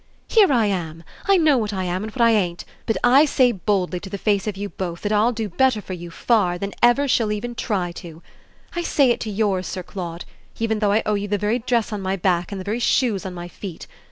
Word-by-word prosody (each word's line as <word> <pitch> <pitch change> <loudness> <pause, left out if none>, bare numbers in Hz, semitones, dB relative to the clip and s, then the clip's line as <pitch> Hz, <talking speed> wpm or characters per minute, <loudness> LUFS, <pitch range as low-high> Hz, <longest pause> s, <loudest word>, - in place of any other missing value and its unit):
"Here 415 -8 +5
I 235 -5 +3
am; 165 -5 -3 0.2
I 395 -1 +5
know 305 -6 +4
what 210 -2 -2
I 190 -1 -2
am 180 +1 -2
and 220 - -5
what 240 - -3
I 230 - +6
ain't; 180 -6 0 0.2
but 225 - +1
I 255 +4 +6
say 255 -4 +3
boldly 190 -3 -1
to 195 - -9
the 200 - -4
face 200 0 0
of 205 -2 -3
you 205 +1 -3
both 175 -4 -5
that 205 - -2
I'll 215 +3 +3
do 225 -2 -3
better 255 +4 +2
for 195 - -7
you, 175 -1 -7
far, 185 -1 +1
than 200 +2 -4
ever 240 +4 +4
she'll 230 -4 +2
even 230 +3 -3
try 190 -7 -2
to. 170 -2 -11 0.5
I 345 - -1
say 280 -6 +3
it - - 0
to 220 - -4
yours, 200 -3 0
Sir 185 - -5
Claude, 175 -2 -6 0.3
even 220 -1 -1
though 205 -2 +2
I 215 +2 +2
owe 215 - +1
you 205 0 -1
the 205 0 0
very 210 +4 0
dress 235 -2 0
on 205 - -3
my 190 0 -1
back 180 -1 0
and 200 - -4
the 185 - -7
very 215 +4 -2
shoes 230 -6 +1
on 180 - -7
my 175 0 -6
feet. 175 -1 -8
205 Hz, 255 wpm, -22 LUFS, 185-235 Hz, 0.5 s, I